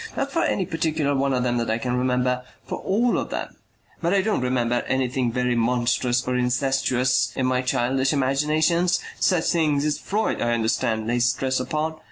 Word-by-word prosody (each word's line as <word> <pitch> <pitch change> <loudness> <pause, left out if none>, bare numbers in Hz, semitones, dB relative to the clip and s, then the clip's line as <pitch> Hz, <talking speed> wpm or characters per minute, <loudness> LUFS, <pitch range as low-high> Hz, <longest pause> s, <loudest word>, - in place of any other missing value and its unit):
Not 275 0 -1
for 330 - 0
any 190 - 0
particular 160 -3 -1
one 140 0 +1
of 125 -1 0
them 120 -1 0
that 115 -1 -1
I 110 - +1
can 125 +1 -2
remember, 125 0 0 0.2
for - - -5
all 230 +5 +1
of - - -4
them. - - -5 0.5
But 175 +3 +1
I 195 - +3
don't 215 -9 0
remember 120 -1 0
anything 130 -2 0
very 125 0 0
monstrous 120 +1 +1
or 125 - 0
incestuous 125 0 +1
in 130 - 0
my 130 0 +1
childish 130 +1 0
imaginations, 155 +6 +1 0.2
such 180 -4 +2
things 150 -4 +1
as 150 -1 0
Freud, 215 +3 -1
I 120 0 +1
understand, 110 -1 0
lays 120 +1 +1
stress 130 0 -1
upon. 155 +4 -2
130 Hz, 185 wpm, -23 LUFS, 125-155 Hz, 0.5 s, I